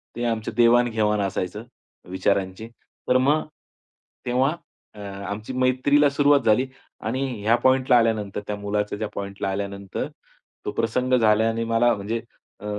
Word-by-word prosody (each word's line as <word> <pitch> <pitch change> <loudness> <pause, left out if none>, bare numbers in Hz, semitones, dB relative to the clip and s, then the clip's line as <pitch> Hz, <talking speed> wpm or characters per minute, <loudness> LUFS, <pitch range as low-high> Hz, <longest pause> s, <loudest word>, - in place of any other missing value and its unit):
ते 120 - -4
आमचं 115 -2 -2
देवाण-घेवाण 115 -3 +3
असायचं 100 +1 -3 0.5
विचारांची. 95 +2 -1 0.4
तर 125 - +4
मग 145 +5 +2 0.8
तेव्हा 130 +6 +1 0.4
अ, 105 - -14
आमची 100 +3 -6
मैत्रीला 130 +3 +3
सुरुवात 145 0 +4
झाली 115 +4 +3 0.4
आणि 130 +4 -1 0.2
ह्या 115 +3 +4
पॉइंटला 130 -1 +5
आल्यानंतर 110 -4 0
त्या 105 - -2
मुलाच्या 105 0 -2
ज्या 110 - -3
पॉइंटला 100 0 -4
आल्यानंतर 100 0 -4 0.6
तो - - -2
प्रसंग 125 +3 -1
झाल्याने 115 +1 +2
मला 115 +1 +3
म्हणजे 110 +3 -3 0.4
अ, 105 - -11
110 Hz, 130 wpm, -24 LUFS, 100-125 Hz, 0.8 s, पॉइंटला